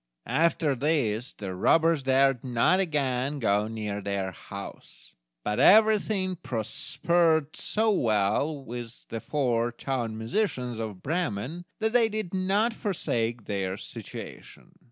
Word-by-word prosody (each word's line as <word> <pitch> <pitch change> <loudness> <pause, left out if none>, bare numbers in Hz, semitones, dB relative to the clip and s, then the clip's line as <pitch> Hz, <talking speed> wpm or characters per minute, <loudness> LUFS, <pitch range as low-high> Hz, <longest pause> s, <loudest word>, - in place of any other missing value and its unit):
After 155 +3 +2
this 125 -4 0
the 95 -3 -6
robbers 160 - +3
dared 135 -1 +3
not 125 +9 +2
again 140 -5 0
go 105 -4 +1
near 105 -2 -4
their 100 -1 -2
house; 100 +3 -10 0.3
but 105 0 -1
everything 210 -3 +4
prospered 160 - +1
so 220 +1 +1
well 120 - +1
with 120 0 -7
the 115 - -4
four 120 -4 0
town 120 -2 -3
musicians 125 - -2
of 105 -5 -6
Bremen, 160 - -2
that 220 0 -1
they 235 -2 +4
did 215 -4 -4
not 195 +5 +1
forsake 120 - -1
their 95 -2 -2
situation! - - -10
130 Hz, 120 wpm, -27 LUFS, 110-170 Hz, 0.3 s, everything